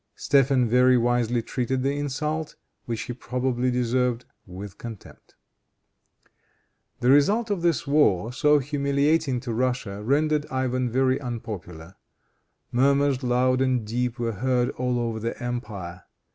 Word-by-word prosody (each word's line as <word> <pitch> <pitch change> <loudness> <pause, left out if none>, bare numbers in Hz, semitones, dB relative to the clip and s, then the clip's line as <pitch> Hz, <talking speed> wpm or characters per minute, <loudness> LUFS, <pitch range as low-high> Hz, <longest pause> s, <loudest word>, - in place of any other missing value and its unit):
Stephen 135 -3 +3
very 125 +2 +4
wisely 120 -1 +1
treated 130 +1 -2
the 140 +1 +1
insult, 150 +2 -3 0.3
which 115 -2 -3
he 120 - -5
probably 125 +1 -1
deserved, 125 0 0 0.2
with 95 +2 -9
contempt. 115 -4 -11 1.7
The 125 +1 +4
result 205 +11 +3
of 195 -4 -1
this 165 -7 +1
war, 125 -7 +2
so 150 +3 +4
humiliating 140 0 +1
to 120 -3 -4
Russia, 120 -4 -2
rendered 150 +5 +1
Ivan 130 -1 -1
very 130 +2 +1
unpopular. 100 - -7 0.7
Murmurs 140 +1 +2
loud 130 +1 +2
and 130 -4 +1
deep 120 +2 -2
were 120 -1 -1
heard 125 +3 0
all 125 -1 -1
over 115 -2 -2
the 115 +2 -4
empire. 105 -8 -6
125 Hz, 130 wpm, -25 LUFS, 120-140 Hz, 1.7 s, very